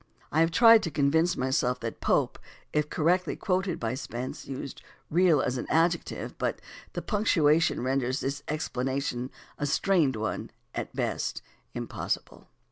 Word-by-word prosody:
I 155 - +2
have 165 0 +5
tried 225 +5 +7
to 165 - -2
convince 160 +4 +2
myself 130 -1 +1
that 115 -1 -5
Pope, - - +1 0.3
if 150 0 +1
correctly 180 +4 +1
quoted 185 -2 -1
by 115 0 -1
Spence, 130 -1 -5
used 135 0 -6 0.3
"real" 170 -3 +4
as 125 0 -1
an - - -5
adjective, 170 +1 0
but - - -1 0.3
the - - -4
punctuation 165 - +2
renders 130 0 0
this 140 +1 -2
explanation, 130 -3 -2 0.3
a 145 - 0
strained 160 -4 +2
one 110 0 -3 0.2
at - - -5
best, - - -2 0.3
impossible. - - -4
145 Hz, 140 wpm, -28 LUFS, 130-170 Hz, 0.3 s, tried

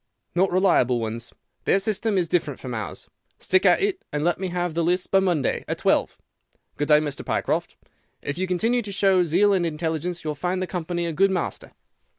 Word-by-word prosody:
"'Not 185 +2 +2
reliable 130 -10 +3
ones. 115 +1 -5 0.3
Their - - +4
system 210 0 0
is 175 -2 +1
different 155 -5 -1
from 125 -2 -6
ours. 110 -3 -6 0.3
Stick 190 +1 +2
at 180 - +4
it, 400 -2 -1
and 150 0 -2
let 175 +2 +1
me 190 - -2
have 175 -1 -2
the 170 +1 0
lists 180 +2 +1
by 195 - +3
Monday, 175 -8 0
at - - -2
twelve. - - +1 0.6
Good 145 - -2
day, 150 - +7
Mr. 145 -2 -2
Pycroft. - - -1 0.5
If 140 - -3
you 185 +2 -2
continue 225 +7 +1
to 205 -3 -7
show 195 -2 +3
zeal 185 +5 +3
and 185 -3 +2
intelligence 165 +1 -2
you 155 - -3
will - - -3
find 180 +5 -2
the 185 - -1
company 175 -1 -3
a 165 - -2
good 195 +5 +3
master. 185 -2 -3
175 Hz, 205 wpm, -24 LUFS, 155-190 Hz, 0.6 s, day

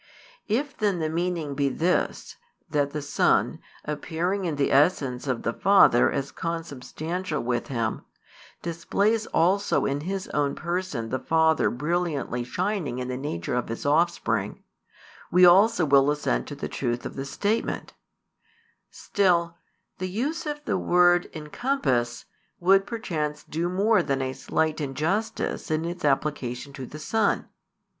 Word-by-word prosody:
If 265 +7 -1
then 205 -4 0
the 160 -2 -1
meaning 170 -3 -2
be 140 0 +1
this, 170 +7 -1 0.3
that 145 -2 0
the 150 0 -5
Son, - - +2 0.3
appearing 170 +6 -2
in 165 -4 -1
the 140 -1 +1
essence 135 -3 +2
of 130 -3 -1
the 115 - -1
Father 195 -10 +5
as 140 0 -3
Consubstantial 165 +1 -4
with 120 0 -1
Him, 115 -4 -2 0.6
displays 200 +6 0
also 195 +4 +2
in 140 +1 -1
His 190 +4 -4
own 145 -1 0
Person 170 -9 -3
the 130 - -1
Father 160 +3 +3
brilliantly 150 -3 -1
shining 175 - -2
in 125 0 -4
the 125 - -2
nature 125 - -4
of 125 0 -1
His 115 - -5
Offspring, 145 - +1 0.7
we 180 +1 +6
also 190 +1 +6
will 140 -1 +5
assent 105 - 0
to - - -6
the - - -4
truth 120 0 -3
of - - -6
the 135 - -3
statement: 205 +10 -2 1.0
still, 170 -4 +1 0.4
the 185 0 -2
use 295 - -2
of 295 0 -5
the - - 0
word 175 0 +4
"encompass" 150 - -1 0.3
would 195 +3 +4
perchance 160 -11 -3
do 170 +3 -2
more 205 +5 +3
than 135 -2 -1
a 130 0 -2
slight 155 +4 -1
injustice 155 - -2
in 155 +1 0
its 175 +1 -5
application 140 -2 -1
to 135 -2 -7
the 150 - -9
Son. 210 +7 0
160 Hz, 145 wpm, -26 LUFS, 135-185 Hz, 1.0 s, we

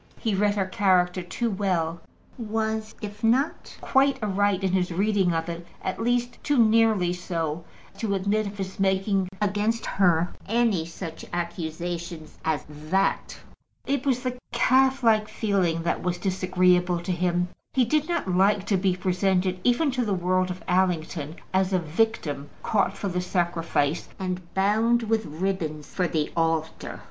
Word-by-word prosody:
He 220 -4 -1
read 205 +1 +2
her 195 -2 +1
character 185 -1 +2
too 220 +6 -2
well; 175 -4 -1 0.3
was, 220 -1 -2
if 205 +1 -7
not 255 +7 +1
quite 275 0 +3
aright 205 -1 +1
in 190 - +1
his 180 -1 +1
reading 195 0 +2
of 165 0 -1
it, 170 0 -5 0.2
at 190 - -3
least 245 +1 0
too 290 -2 +1
nearly 220 -5 +4
so 165 -3 -3 0.4
to 205 -3 0
admit 200 +2 0
of 200 +1 -8
his 190 -1 -5
making 195 0 +1
against 210 +2 0
her 175 -3 +2
any 220 -7 +1
such 165 -1 -7
accusation 170 -1 -4 0.2
as 155 -3 -1
that. 155 +6 -1 0.5
It 275 -1 0
was 260 -3 +1
the 250 -1 -3
calf 260 +2 +3
like 215 -2 +4
feeling 185 -6 0
that 170 - -1
was 180 -1 -1
disagreeable 180 -2 +2
to 175 - -3
him. 175 0 0 0.2
He 255 -2 +3
did 305 +6 +1
not 340 - -1
like 195 +2 +3
to 200 -1 +2
be 185 -1 +1
presented, 185 0 +1
even 270 +5 +3
to 255 -1 0
the 205 -4 0
world 185 +1 +1
of 180 0 -6
Allington, 170 -4 0 0.2
as 190 0 +2
a - - +4
victim 160 -4 -1
caught 200 -2 +1
for 200 - -3
the 180 -1 -1
sacrifice, 170 -4 0
and 185 -2 -4
bound 220 +5 +3
with 220 -1 0
ribbon 160 -2 -2
for 180 +4 -2
the 155 -3 -1
altar. 165 -1 -1
190 Hz, 155 wpm, -26 LUFS, 175-215 Hz, 0.5 s, nearly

